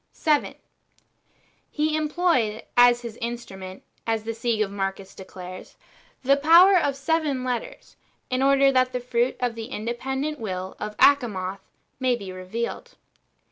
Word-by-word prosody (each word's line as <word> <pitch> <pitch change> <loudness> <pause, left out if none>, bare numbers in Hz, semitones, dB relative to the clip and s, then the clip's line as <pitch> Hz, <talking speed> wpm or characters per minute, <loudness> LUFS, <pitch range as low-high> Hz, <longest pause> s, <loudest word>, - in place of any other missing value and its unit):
7. 300 -3 +1 1.1
He 305 0 0
employed 305 -8 0
as 245 0 +5
his 230 -1 -7
instrument, 195 -6 -7 0.2
as 225 -1 0
the 225 - -3
Sige 230 -1 0
of 195 - -10
Marcus 195 -1 -4
declares, 185 -1 -10 0.5
the 275 +2 +4
power 340 +7 +7
of 285 -6 +2
seven 285 -2 -1
letters," 250 -2 -5 0.3
in 255 0 -1
order 275 0 +5
that 255 -1 +2
the 250 - -1
fruit 245 0 0
of 245 -2 -1
the 225 -1 -6
independent 265 +5 -3
will 185 -3 -5
[of 210 0 -6
Achamoth] 200 -9 +3 0.4
might 255 -2 +1
be 195 -4 -8
revealed. 185 +6 -5
240 Hz, 140 wpm, -24 LUFS, 210-275 Hz, 1.1 s, power